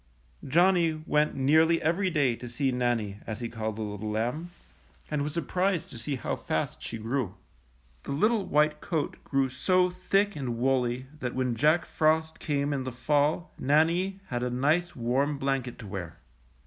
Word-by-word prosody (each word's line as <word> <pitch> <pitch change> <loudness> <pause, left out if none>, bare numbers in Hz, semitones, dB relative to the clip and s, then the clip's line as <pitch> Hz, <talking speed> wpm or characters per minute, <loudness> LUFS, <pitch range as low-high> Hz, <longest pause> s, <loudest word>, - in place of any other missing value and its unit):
^^ - - -8
Johnny 170 +1 +4
went 150 -1 +2
nearly 160 +5 +4
every 180 +4 +1
day 145 -8 +2
to 120 +1 -8
see 135 +3 0
Nan 120 -1 +1
nie, 100 -2 -6
as 110 0 -4
he 120 - -3
called 110 -2 -4
the 110 - -4
little 105 0 -4
lamb, 120 +11 -2 0.6
and 150 -1 0
was 150 +1 -2
surprised 180 +1 0
to 120 - -8
see 140 +5 -3
how 130 - -2
fast - - -3
she 115 - -5
grew. 115 -3 -2 0.7
The - - -7
little 215 +9 +2
white 150 +1 +2
coat 160 -6 -3
grew 135 -1 +1
so 180 +8 +2
thick 195 +3 +1
and 125 -5 -3
woolly 125 0 +1
that 125 -4 -3
when 130 -2 0
Jack 155 +7 +3
Frost 160 0 +1
came 145 -1 0
in 135 -2 -2
the 130 - -4
fall 150 +7 +1
Nannie 170 +7 +2
had 120 -1 -2
a 125 - 0
nice 150 +8 +1
warm 135 +4 0
blanket 135 -3 -1
to 110 - -9
wear. 90 -4 -6
140 Hz, 180 wpm, -28 LUFS, 120-160 Hz, 0.7 s, Johnny